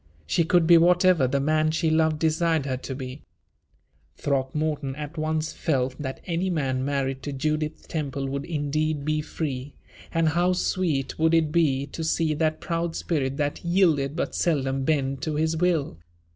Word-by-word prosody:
She 165 - +2
could 175 0 +3
be 170 0 +7
whatever 175 -4 +4
the 140 +2 0
man 155 +2 +2
she 160 0 +1
loved 160 -1 +2
desired 160 -1 +1
her 130 -2 -1
to 130 +1 -6
be. 130 +1 -7 0.9
Throckmorton 140 0 -1
at 150 +2 -7
once 155 0 -1
felt 130 -4 -1
that 130 -2 -5
any 175 +2 -1
man 135 -6 -1
married 135 -1 -1
to 145 - -5
Judith 155 +2 -2
Temple 140 -3 -3
would 140 +1 -3
indeed 155 -1 -1
be 155 0 +1
free, 145 -3 -5 0.4
and 165 -1 +2
how 175 +3 +2
sweet 170 -7 -1
would 160 +1 +4
it 160 -2 +2
be 145 -5 +2
to 155 +3 -6
see 160 -1 +1
that 155 +1 0
proud 165 -1 -2
spirit 135 -5 -1
that 145 -1 -2
yielded 165 -6 +2
but 170 - -2
seldom 135 -5 0
bend 135 -3 0
to 155 0 -2
his 160 +1 +1
will! 160 - 0
155 Hz, 170 wpm, -25 LUFS, 140-165 Hz, 0.9 s, be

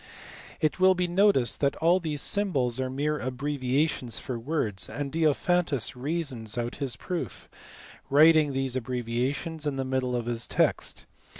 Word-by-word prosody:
It 155 +3 0
will 185 0 +5
be 180 0 0
noticed 175 - +3
that 140 -1 +1
all 170 +3 +3
these 155 -5 0
symbols 135 - 0
are 130 -1 -1
mere 150 +3 -1
abbre 140 +3 -3
viations 130 -1 0
for 125 -3 -5
words, 115 - -2
and 145 -1 -4
Diophantus 160 -4 +1
reasons 130 -5 -3
out 120 0 -3
his 135 -4 -1
proofs, 165 - -5 0.6
writing 155 +1 +6
these 135 -1 -1
abbreviations 130 +6 -2
in 145 - -1
the 135 0 -2
middle 130 -1 -1
of 120 -1 -2
his 120 -1 -1
text. - - 0
140 Hz, 155 wpm, -27 LUFS, 125-160 Hz, 0.6 s, writing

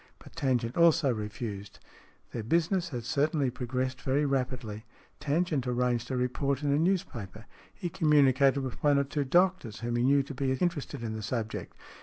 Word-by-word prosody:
But - - -16
Tangent 125 -3 0
also 165 -5 +4
refused. 105 -2 -6 0.5
Their 115 - -4
business 170 - +1
had 120 -6 -5
certainly 145 0 +1
progressed 130 +1 -3
very 135 +3 +1
rapidly. 125 -6 -2 0.4
Tangent 150 -3 0
arranged 125 -1 0
a 130 - -1
report 135 +3 -1
in 145 - +1
a 145 - +3
news 185 +3 +2
paper. 110 - -9 0.3
He 175 - -5
communicated 140 -3 +4
with 130 -3 -6
one 145 -1 +4
or 140 - +3
two 140 +1 -2
doctors 175 - +1
whom 120 0 -1
he 120 - +1
knew 140 +2 +4
to 140 - -8
be 130 0 0
interested 150 -5 -2
in 110 -1 -3
the 110 - -5
subject. 110 0 -4
130 Hz, 175 wpm, -29 LUFS, 120-150 Hz, 0.5 s, also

